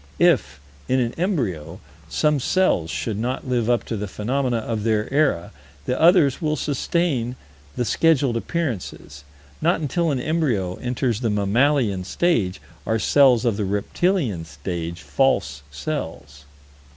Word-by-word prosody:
If, -, -, +2 dB, 0.3 s
in 130 Hz, -, +2 dB
an 120 Hz, -1 st, 0 dB
embryo, 115 Hz, -, -2 dB, 0.3 s
some 150 Hz, -, +2 dB
cells 135 Hz, -, +1 dB
should 105 Hz, +4 st, -3 dB
not 125 Hz, +3 st, -3 dB
live 120 Hz, -2 st, 0 dB
up 120 Hz, -1 st, +2 dB
to 115 Hz, -, -4 dB
the 105 Hz, 0 st, -4 dB
phenomena 125 Hz, +5 st, -1 dB
of 110 Hz, -1 st, -3 dB
their 110 Hz, -1 st, +1 dB
era, 140 Hz, -, +1 dB, 0.3 s
the 125 Hz, -, -1 dB
others 165 Hz, -5 st, +5 dB
will 155 Hz, -1 st, 0 dB
sustain 140 Hz, -3 st, -1 dB, 0.4 s
the 120 Hz, -, -1 dB
scheduled 140 Hz, -4 st, +2 dB
appearances. 115 Hz, -, -4 dB, 0.4 s
Not 170 Hz, +2 st, +2 dB
until 165 Hz, +2 st, 0 dB
an 140 Hz, -4 st, 0 dB
embryo 125 Hz, -, -1 dB
enters 125 Hz, -2 st, -1 dB
the 120 Hz, -3 st, 0 dB
mammalian 105 Hz, 0 st, +2 dB
stage 95 Hz, -, 0 dB, 0.2 s
are 110 Hz, -, 0 dB
cells 125 Hz, +1 st, +4 dB
of 115 Hz, -4 st, +1 dB
the 105 Hz, -, -1 dB
reptilian 105 Hz, -, 0 dB
stage 85 Hz, +2 st, -6 dB
false 70 Hz, -, +1 dB
cells. 75 Hz, -, -6 dB
120 Hz, 140 wpm, -22 LUFS, 100-145 Hz, 0.4 s, others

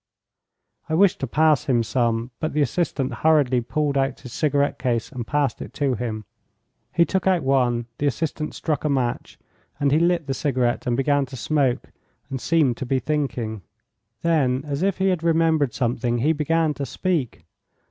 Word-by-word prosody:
I 160 Hz, -, +1 dB
wished 195 Hz, +2 st, +4 dB
to 135 Hz, -, -2 dB
pass 155 Hz, +1 st, +3 dB
him 120 Hz, -4 st, +2 dB
some, 115 Hz, 0 st, 0 dB
but 155 Hz, -, -2 dB
the 150 Hz, -, +1 dB
assistant 140 Hz, -2 st, -1 dB
hurriedly 140 Hz, -3 st, +3 dB
pulled 145 Hz, +3 st, 0 dB
out 135 Hz, -1 st, -1 dB
his 125 Hz, -, -10 dB
cigarette 145 Hz, -2 st, +1 dB
case 120 Hz, 0 st, -1 dB
and 120 Hz, -5 st, -6 dB
passed 145 Hz, -5 st, 0 dB
it -, -, -8 dB
to 140 Hz, -3 st, +1 dB
him. 110 Hz, -2 st, -4 dB, 0.7 s
He 170 Hz, -, +3 dB
took 190 Hz, +1 st, -1 dB
out 180 Hz, -5 st, +3 dB
one, 125 Hz, -3 st, +1 dB
the 145 Hz, -, +1 dB
assistant 150 Hz, +2 st, -2 dB
struck 155 Hz, -4 st, -2 dB
a 150 Hz, -, 0 dB
match, 130 Hz, -4 st, -2 dB, 0.4 s
and 140 Hz, -1 st, +2 dB
he 150 Hz, -, +4 dB
lit 170 Hz, -1 st, +2 dB
the 135 Hz, -, -2 dB
cigarette 130 Hz, -4 st, 0 dB
and 120 Hz, -1 st, +1 dB
began 140 Hz, 0 st, +2 dB
to 130 Hz, -, -9 dB
smoke 135 Hz, +1 st, 0 dB, 0.4 s
and 130 Hz, -2 st, -3 dB
seemed 150 Hz, -8 st, +2 dB
to -, -, -4 dB
be 135 Hz, -, +1 dB
thinking. 130 Hz, -7 st, -2 dB, 0.6 s
Then, 135 Hz, -6 st, +2 dB
as 145 Hz, 0 st, -3 dB
if 195 Hz, -1 st, +1 dB
he 190 Hz, +1 st, +2 dB
had 180 Hz, -3 st, 0 dB
remembered 160 Hz, -4 st, +2 dB
something, 120 Hz, -1 st, 0 dB
he 145 Hz, +7 st, +2 dB
began 160 Hz, +1 st, +1 dB
to 140 Hz, -, -4 dB
speak. 165 Hz, -9 st, -2 dB
140 Hz, 180 wpm, -23 LUFS, 125-155 Hz, 0.7 s, wished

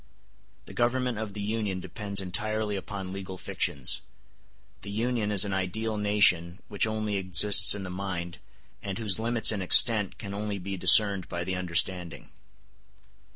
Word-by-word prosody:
The -, -, -12 dB
government 120 Hz, -1 st, -1 dB
of 110 Hz, -2 st, -6 dB
the 105 Hz, -, -6 dB
Union 105 Hz, -3 st, -3 dB
depends 100 Hz, +2 st, -6 dB
entirely 105 Hz, +3 st, -3 dB
upon 95 Hz, -1 st, -7 dB
legal 95 Hz, -1 st, -7 dB
fictions; 70 Hz, -6 st, -1 dB, 0.8 s
the 100 Hz, -, -9 dB
Union 110 Hz, 0 st, -2 dB
is 100 Hz, -1 st, +4 dB
an 100 Hz, -, -4 dB
ideal 110 Hz, +4 st, -3 dB
nation 100 Hz, -4 st, +2 dB
which 105 Hz, +1 st, +1 dB
only 110 Hz, -2 st, -3 dB
exists 95 Hz, +2 st, +5 dB
in 100 Hz, -, -7 dB
the 95 Hz, -, -7 dB
mind, 90 Hz, -2 st, -6 dB, 0.4 s
and 95 Hz, -1 st, -6 dB
whose 110 Hz, -3 st, -1 dB
limits 115 Hz, 0 st, +4 dB
and 105 Hz, -3 st, -4 dB
extent 105 Hz, +2 st, +5 dB
can 100 Hz, -3 st, -7 dB
only 105 Hz, 0 st, -4 dB
be 95 Hz, +1 st, -6 dB
discerned 100 Hz, 0 st, +4 dB
by 85 Hz, 0 st, -4 dB
the 95 Hz, +1 st, -4 dB
understanding. 90 Hz, -1 st, -2 dB
100 Hz, 155 wpm, -27 LUFS, 95-110 Hz, 0.8 s, exists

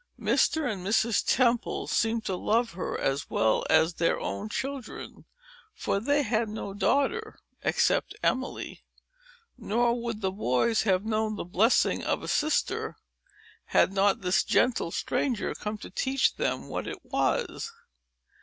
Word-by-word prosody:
Mr. 315 Hz, -2 st, +2 dB
and 200 Hz, -6 st, -3 dB
Mrs. 220 Hz, +3 st, +2 dB
Temple 240 Hz, -2 st, +1 dB
seemed 225 Hz, 0 st, 0 dB
to 190 Hz, -, -1 dB
love 230 Hz, +6 st, +1 dB
her 175 Hz, -, -4 dB
as 135 Hz, +1 st, -1 dB
well 110 Hz, 0 st, +2 dB
as 160 Hz, +2 st, +4 dB
their 165 Hz, 0 st, +1 dB
own 100 Hz, +2 st, -4 dB
children; 270 Hz, -, -6 dB, 0.5 s
for 195 Hz, -, -1 dB
they 285 Hz, +6 st, +2 dB
had 225 Hz, -2 st, 0 dB
no 210 Hz, -2 st, -5 dB
daughter 285 Hz, -, 0 dB, 0.2 s
except -, -, +1 dB
Emily; 260 Hz, +1 st, -2 dB, 0.8 s
nor 235 Hz, +2 st, +1 dB
would 230 Hz, -2 st, -4 dB
the 190 Hz, -1 st, 0 dB
boys 190 Hz, -, +1 dB
have 195 Hz, -1 st, +1 dB
known 220 Hz, -1 st, 0 dB
the -, -, -5 dB
blessing 205 Hz, +7 st, +2 dB
of -, -, -1 dB
a -, -, -6 dB
sister, 305 Hz, +1 st, 0 dB, 0.7 s
had 195 Hz, -, +3 dB
not 200 Hz, +2 st, +2 dB
this 180 Hz, -1 st, +2 dB
gentle 245 Hz, -8 st, +2 dB
stranger 240 Hz, +6 st, -1 dB
come 210 Hz, +1 st, -5 dB
to -, -, -10 dB
teach 265 Hz, 0 st, +1 dB
them -, -, -2 dB
what -, -, -4 dB
it -, -, -5 dB
was. 470 Hz, -1 st, -1 dB
220 Hz, 145 wpm, -28 LUFS, 190-245 Hz, 0.8 s, as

